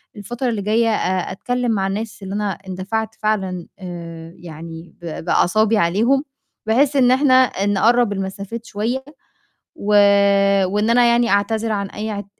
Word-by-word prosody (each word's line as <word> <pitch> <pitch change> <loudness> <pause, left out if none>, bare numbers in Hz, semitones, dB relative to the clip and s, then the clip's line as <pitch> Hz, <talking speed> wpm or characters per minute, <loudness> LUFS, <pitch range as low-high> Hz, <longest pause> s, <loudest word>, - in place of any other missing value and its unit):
الفترة 240 +5 -4
اللي 220 -3 -2
جايّة 225 +3 +1
أ 185 -4 -1
أتكلِّم 245 +4 -2
مع 195 -3 0
الناس 210 0 -5
اللي 190 - -6
أنا 205 -1 -1
اندفعت 190 +4 -5
فعلًا 190 -5 -2
آآ 170 -2 -8
يعني 165 0 -10
ب 165 -1 -6
بأعصابي 215 +5 +2
عليهم، 225 - +2 0.4
بحيث 270 +6 +2
إن 250 -2 +4
إحنا 260 +1 +3
آآ 255 -6 +3
نقرّب 225 +2 +2
المسافات 200 +4 -6
شوية 235 +6 -3 0.7
و 205 - -9 0.8
وإن 210 +4 0
أنا 240 +1 +4
يعني 235 0 +2
أعتذر 220 +2 0
عن 200 -2 -2
أي 215 +2 -5
اعت 205 -1 -5
210 Hz, 150 wpm, -19 LUFS, 190-235 Hz, 0.8 s, إن